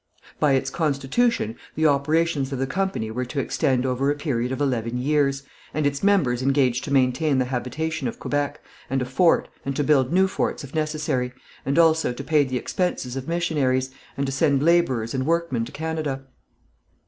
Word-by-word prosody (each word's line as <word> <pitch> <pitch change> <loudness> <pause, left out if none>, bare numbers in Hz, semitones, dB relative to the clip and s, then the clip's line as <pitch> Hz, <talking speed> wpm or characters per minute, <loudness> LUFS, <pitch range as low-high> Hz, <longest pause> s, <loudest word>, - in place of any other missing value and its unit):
By 145 -2 +3
its 135 - 0
constitution 150 - 0 0.2
the 160 - +1
operations 145 0 +2
of 135 - -2
the 135 - 0
company 190 - -2
were 125 +3 -2
to 130 +3 -4
extend 135 -2 0
over 130 +2 0
a 145 - +1
period 130 -5 -2
of 130 - -3
eleven 125 -4 -1
years, 140 +1 +1 0.3
and 155 -1 0
its 140 0 0
members 165 -12 +2
engaged 130 -2 +2
to - - -5
maintain 135 +2 +2
the 130 - +2
habitation 135 +4 -3
of 115 - -5
Quebec, 145 -1 -2 0.3
and 135 0 0
a - - -3
fort, 165 +7 +3 0.2
and 135 0 -3
to 145 - +1
build 135 -3 +3
new 190 +2 +4
forts 190 - -2
if 140 - -10
necessary, 150 -5 -1 0.3
and 140 +3 +1
also 160 -5 +4
to 140 - -7
pay 150 0 +3
the 130 -2 -2
expenses 130 -3 -2
of 135 +1 -5
missionaries, 145 -7 0 0.3
and 140 - 0
to 135 - -2
send 140 0 +2
labourers 140 -9 +2
and 130 +1 -1
workmen 165 -8 0
to - - -10
Canada. 155 -3 -3
140 Hz, 185 wpm, -24 LUFS, 130-155 Hz, 0.3 s, new